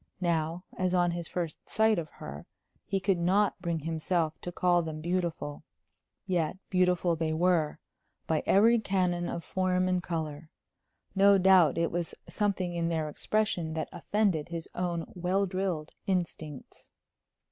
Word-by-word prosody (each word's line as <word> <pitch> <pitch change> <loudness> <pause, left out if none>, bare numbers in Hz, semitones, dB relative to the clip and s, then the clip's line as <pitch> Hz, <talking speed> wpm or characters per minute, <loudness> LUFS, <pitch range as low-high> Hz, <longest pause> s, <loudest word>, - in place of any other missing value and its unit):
Now, 170 -1 0
as 185 0 0
on 175 -1 +3
his 170 -1 -4
first 170 -3 -5
sight 220 -2 +3
of 155 -2 -5
her, 75 +1 -9 0.4
he 195 - 0
could 190 -2 +1
not 190 +3 +2
bring 170 -3 -1
himself 160 +1 0
to 175 - -5
call 175 0 +3
them 160 -2 -5
beautiful. 170 -3 -2 0.6
Yet 175 -2 0
beautiful 180 -2 +3
they 160 -1 -1
were, 165 -2 +2 0.5
by 160 -1 +1
every 230 +4 +5
canon 180 -4 0
of 170 - -4
form 185 0 +1
and 180 -1 +1
color. 160 -3 -4 0.6
No 200 0 +6
doubt 185 -5 +5
it 170 0 +1
was 175 -1 -3
something 190 -4 -1
in 170 -1 0
their 160 -2 -1
expression 175 -2 -1
that 160 - -2
offended 175 -3 0
his 170 -1 -4
own 175 -2 -2
well 185 +3 +1
drilled 185 -5 -2 0.2
instincts. 165 -6 -4
175 Hz, 145 wpm, -29 LUFS, 160-185 Hz, 0.6 s, No